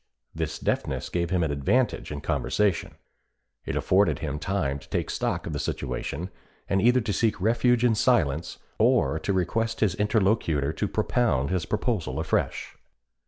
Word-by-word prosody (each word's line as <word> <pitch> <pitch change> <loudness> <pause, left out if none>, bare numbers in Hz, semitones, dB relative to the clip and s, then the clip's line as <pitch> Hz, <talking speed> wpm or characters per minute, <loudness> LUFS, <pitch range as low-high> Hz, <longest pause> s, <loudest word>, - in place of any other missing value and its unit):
This 80 -1 -3
deafness - - -2
gave 85 -1 -1
him 90 -1 +1
an 80 - 0
advantage 90 - 0
in 75 -1 -5
conversation; 100 -5 0 0.7
it - - -2
afforded 100 +2 +3
him 75 -1 -4
time 75 -6 -1
to - - -17
take - - -2
stock - - -2
of - - -4
the - - -2
situation, 90 +6 -4 0.4
and 95 0 +1
either 125 +3 +4
to 105 -2 -2
seek 110 -1 +1
refuge 120 +4 +3
in 120 - +4
silence 85 - +1 0.2
or 80 - +3
to 90 - -2
request 115 +5 0
his 105 -5 +3
interlocutor 95 - +1
to 105 - -1
propound 110 - +1
his 90 -2 -1
proposal 110 -4 -1
afresh. - - -1
95 Hz, 160 wpm, -26 LUFS, 80-110 Hz, 0.7 s, either